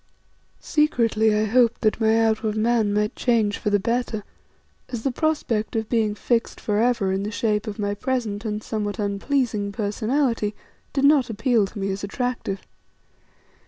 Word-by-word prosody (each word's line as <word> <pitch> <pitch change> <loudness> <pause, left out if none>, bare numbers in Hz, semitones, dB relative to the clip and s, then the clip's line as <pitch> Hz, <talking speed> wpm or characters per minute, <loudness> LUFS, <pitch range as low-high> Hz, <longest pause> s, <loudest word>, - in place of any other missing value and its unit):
Secretly 230 -8 +2
I 215 +1 +2
hoped 235 +1 +3
that 215 +1 +1
my 220 0 +4
outward 220 -1 +1
man 220 -1 +2
might 210 +1 0
change 220 -4 +1
for - - -1
the 205 - +3
better, 230 0 -1 0.7
as 235 -3 -5
the 270 - +1
prospect 245 -7 -1
of 220 -1 -1
being 220 -3 +1
fixed 230 +2 -1
for 210 -1 0
ever 230 -5 +2
in 190 +1 0
the 205 - -3
shape 215 0 -1
of 210 - -4
my 205 -1 -1
present 225 -2 -2
and 215 -1 -3
somewhat 205 -2 -3
unpleasing 210 +1 -1
personality, 215 +2 0 0.4
did 275 - -1
not 280 -4 +5
appeal 225 -1 +2
to 215 - -12
me 195 0 -1
as 195 +1 -5
attractive. 215 -2 -3
220 Hz, 160 wpm, -23 LUFS, 205-240 Hz, 0.7 s, not